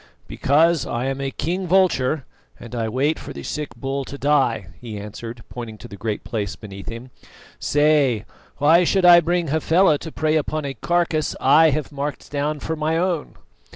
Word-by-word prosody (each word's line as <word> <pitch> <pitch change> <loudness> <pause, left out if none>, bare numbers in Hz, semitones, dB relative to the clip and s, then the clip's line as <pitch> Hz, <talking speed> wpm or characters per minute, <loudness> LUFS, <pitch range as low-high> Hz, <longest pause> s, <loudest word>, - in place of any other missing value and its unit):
"Because 160 +2 +2
I 120 +2 -2
am 135 0 -2
a 135 - -1
king 180 +7 -3
vulture, 160 -7 +2 0.3
and 120 - -11
I 115 -2 -1
wait 140 +7 0
for - - -8
the - - -8
sick 150 -6 -5
bull 135 +3 -3
to 140 - -8
die," 135 -10 +1
he 115 -4 -7
answered, 115 +3 -8
pointing 115 -3 -8
to - - -11
the 100 - -10
Great 105 0 -4
Place 105 -5 -3
beneath 100 -2 -9
him. 115 +2 -8 0.5
"Say, 145 -7 +2 0.3
why 160 +5 +5
should 185 +1 +2
I 175 -1 +9
bring 170 -1 0
Hafela 160 +1 +3
to 160 - -8
prey 155 0 +1
upon 155 0 -2
a 140 - -3
carcase 165 +3 0
I 155 +4 +6
have 150 0 -2
marked 140 -1 -5
down 150 +1 -1
for 160 - -3
my 155 +1 0
own?" 175 -3 -1
145 Hz, 185 wpm, -22 LUFS, 120-160 Hz, 0.5 s, I